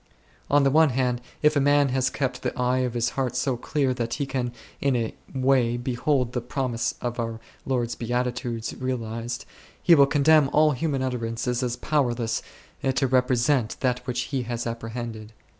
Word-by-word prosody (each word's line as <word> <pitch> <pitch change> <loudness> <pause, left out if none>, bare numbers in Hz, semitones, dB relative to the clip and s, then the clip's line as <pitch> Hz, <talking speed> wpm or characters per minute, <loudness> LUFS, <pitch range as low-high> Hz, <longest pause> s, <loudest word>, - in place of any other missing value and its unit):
On 145 0 +4
the 135 - +3
one 160 +1 +5
hand, 125 -1 0 0.2
if 150 0 +5
a - - +4
man 145 0 +4
has 130 0 +1
kept 135 -3 -2
the - - -3
eye 125 +1 +2
of 125 -2 -1
his 120 -1 +1
heart 130 -2 -2
so 125 0 0
clear 135 +2 0
that 120 -2 -2
he 145 - -2
can 130 -3 -2 0.3
in 140 -2 +1
a 115 -2 -1 0.2
way 130 -3 +2
behold 125 +1 0
the 125 - -1
promise 125 -1 -2
of 120 0 -3
our 115 -1 -3 0.3
Lord's 120 -3 0
Beatitudes 120 -1 -2
realized, 120 -2 -3 0.3
he 175 - +5
will 140 -4 +7
condemn 145 0 +4
all 155 +1 +4
human 140 -1 -1
utterance 115 -2 -3
as 125 0 0
powerless 120 -6 0 0.5
to 135 - +2
represent 125 -1 +2
that 125 -2 +1
which 125 0 -1
he 135 +1 -2
has 120 -1 -4
apprehended. 115 -1 -5
125 Hz, 175 wpm, -25 LUFS, 120-135 Hz, 0.5 s, will